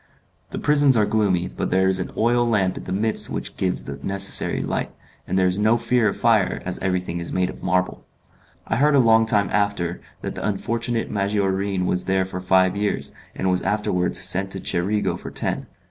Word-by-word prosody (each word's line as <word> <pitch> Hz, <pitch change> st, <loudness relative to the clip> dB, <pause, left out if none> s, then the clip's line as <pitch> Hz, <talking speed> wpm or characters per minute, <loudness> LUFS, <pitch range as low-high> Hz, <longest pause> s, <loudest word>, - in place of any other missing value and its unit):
The -, -, -6 dB
prisons 145 Hz, -4 st, +4 dB
are 105 Hz, -, +4 dB
gloomy, 100 Hz, -5 st, +1 dB
but -, -, -4 dB
there 95 Hz, 0 st, +2 dB
is 95 Hz, 0 st, +1 dB
an 90 Hz, -, -3 dB
oil 120 Hz, +2 st, +2 dB
lamp 95 Hz, -4 st, +1 dB
in -, -, -8 dB
the -, -, -6 dB
midst 110 Hz, +3 st, 0 dB
which -, -, -5 dB
gives 95 Hz, -1 st, -1 dB
the -, -, -7 dB
necessary 100 Hz, 0 st, +1 dB
light, -, -, -3 dB, 0.4 s
and 95 Hz, -, -1 dB
there 95 Hz, -, +3 dB
is 90 Hz, +2 st, 0 dB
no 110 Hz, +3 st, +3 dB
fear 120 Hz, -1 st, +1 dB
of 100 Hz, -, -2 dB
fire 110 Hz, -5 st, +2 dB
as 95 Hz, -, -4 dB
everything 90 Hz, -2 st, -2 dB
is 85 Hz, -, -5 dB
made 90 Hz, 0 st, 0 dB
of -, -, -13 dB
marble. 90 Hz, 0 st, -1 dB, 0.6 s
I 115 Hz, -, -1 dB
heard, 145 Hz, +3 st, +3 dB
a -, -, +6 dB
long 115 Hz, -2 st, +4 dB
time 105 Hz, -2 st, +2 dB
after, 100 Hz, -4 st, -1 dB, 0.2 s
that -, -, -4 dB
the -, -, -6 dB
unfortunate 115 Hz, +3 st, -2 dB
Maggiorin 100 Hz, -1 st, 0 dB
was 90 Hz, 0 st, -1 dB
there 95 Hz, 0 st, +1 dB
for 95 Hz, 0 st, -6 dB
five 95 Hz, 0 st, +3 dB
years, 105 Hz, 0 st, -2 dB, 0.2 s
and 95 Hz, -, 0 dB
was 90 Hz, -, 0 dB
afterwards 95 Hz, -4 st, 0 dB
sent 95 Hz, +1 st, +2 dB
to 95 Hz, -, -5 dB
Cerigo 100 Hz, +4 st, -1 dB
for -, -, -8 dB
ten. -, -, -3 dB
100 Hz, 205 wpm, -22 LUFS, 95-110 Hz, 0.6 s, a